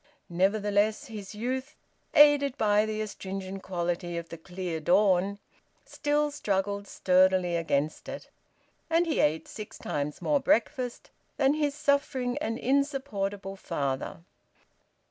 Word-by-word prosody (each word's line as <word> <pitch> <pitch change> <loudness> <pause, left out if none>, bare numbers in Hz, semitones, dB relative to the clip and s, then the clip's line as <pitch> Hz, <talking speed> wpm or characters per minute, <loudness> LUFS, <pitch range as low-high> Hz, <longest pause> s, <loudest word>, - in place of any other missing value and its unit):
Nevertheless 205 +6 +1
his 210 -5 -8
youth, 260 +6 -3 0.4
aided 290 -2 +6
by 210 0 +3
the 215 0 -2
astringent 195 -2 -5
quality 175 -1 -2
of 170 0 -6
the 165 - -7
clear 175 -1 -4
dawn, 190 +3 +3 0.5
still 295 0 0
struggled 200 -6 -1
sturdily 185 -2 +3
against 155 -3 -1
it. - - -7 0.6
And 330 +1 +3
he 320 - 0
ate 155 +2 +2
six 215 -2 -8
times 145 0 -3
more 290 -1 +2
breakfast 255 -2 0 0.3
than 270 0 +4
his 295 -2 0
suffering 280 -4 +1
and 225 +1 -2
insupportable 240 -9 -1
father. 140 -3 -3
205 Hz, 120 wpm, -28 LUFS, 185-270 Hz, 0.6 s, aided